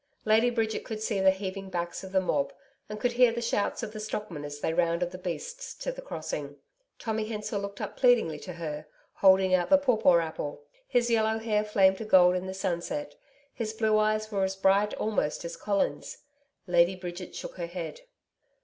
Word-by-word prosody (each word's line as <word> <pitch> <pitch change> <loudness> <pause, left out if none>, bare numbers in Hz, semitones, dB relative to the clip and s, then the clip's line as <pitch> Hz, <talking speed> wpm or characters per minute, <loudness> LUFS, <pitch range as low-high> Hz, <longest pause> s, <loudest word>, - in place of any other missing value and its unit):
Lady 220 +3 +4
Bridget 225 -2 -1
could 220 -1 -5
see 215 -2 -1
the 190 0 +6
heaving 190 0 -3
backs 175 -1 -3
of 190 - -8
the 190 - +3
mob, 145 -6 0 0.4
and 210 0 -6
could 245 - +1
hear 240 0 +5
the 235 - -3
shouts 235 -2 -1
of 220 - -4
the 215 - -7
stockmen 210 -7 -5
as 145 0 -6
they 160 - -1
rounded 170 +1 +1
the 185 - -7
beasts 475 - -5
to - - -4
the - - -8
crossing. - - -5 0.4
Tommy 220 -2 -2
Hensor 210 -1 -3
looked 200 0 -6
up - - -5
pleadingly 235 - +3
to 180 - -7
her, 155 -3 -6 0.3
holding 190 -1 +5
out 180 -1 +2
the 285 - +8
pawpaw 220 -10 +4
apple. 160 -3 -3 0.2
His 240 -2 +2
yellow 220 -1 +2
hair 215 -2 0
flamed 190 -2 +3
to 225 - -5
gold 180 -3 +6
in 185 +1 -3
the 190 - -4
sunset, 170 -5 -3 0.4
his 220 -2 -3
blue 220 -1 +2
eyes 215 0 +1
were 200 -2 0
as 190 0 -1
bright 195 +2 +3
almost 210 -8 -1
as 170 0 -5
Colin's. 200 -2 -1 0.5
Lady 175 0 +3
Bridget 180 0 -7
shook - - -7
her 170 -1 -3
head. 175 - -6
195 Hz, 195 wpm, -28 LUFS, 175-220 Hz, 0.5 s, the